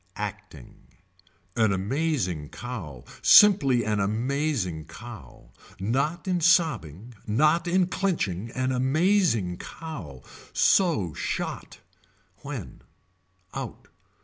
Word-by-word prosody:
Acting. 105 -9 -8 0.7
An 110 -3 +3
amazing 95 - -1
cow. 90 - -7 0.2
Simply 140 - +6
an 105 -1 0
amazing 110 - -1
cow. 105 - -12 0.3
Not 140 - -1
in 180 -2 0
sobbing. 125 - +1
Not 155 +10 +2
in 180 +1 +3
clenching. 140 - -2
An 130 0 0
amazing 130 - +2
cow. 90 - -8 0.3
So 155 - +3
shot. - - -4 0.6
When. - - -7 0.7
Out. - - -7
120 Hz, 90 wpm, -26 LUFS, -, 0.7 s, Simply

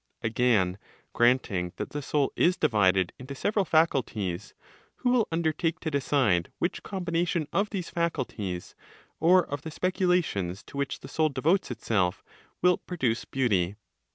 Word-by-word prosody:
Again, 110 -5 +2 0.3
granting 115 -8 +2
that - - -5
the 145 - -4
soul 145 0 0
is 180 +1 +3
divided 95 -4 +3
into 130 +2 -7
several 205 +6 0
faculties, 115 - 0 0.4
who 245 - 0
will 245 -3 +3
undertake 165 +1 0
to 160 - -2
decide 130 - +1
which 175 - -1
combination 170 -4 -1
of 200 +1 +1
these 185 -5 -4
faculties, 120 - -3 0.5
or 180 +3 +5
of 145 0 -5
the 160 - -6
speculations 175 - 0
to - - -11
which 140 -1 -2
the - - -9
soul 155 -1 +1
devotes 155 +8 +1
itself, 105 -6 -1 0.4
will 180 -1 +4
produce 125 -10 -2
beauty? 100 -8 +1
140 Hz, 140 wpm, -28 LUFS, 105-170 Hz, 0.5 s, or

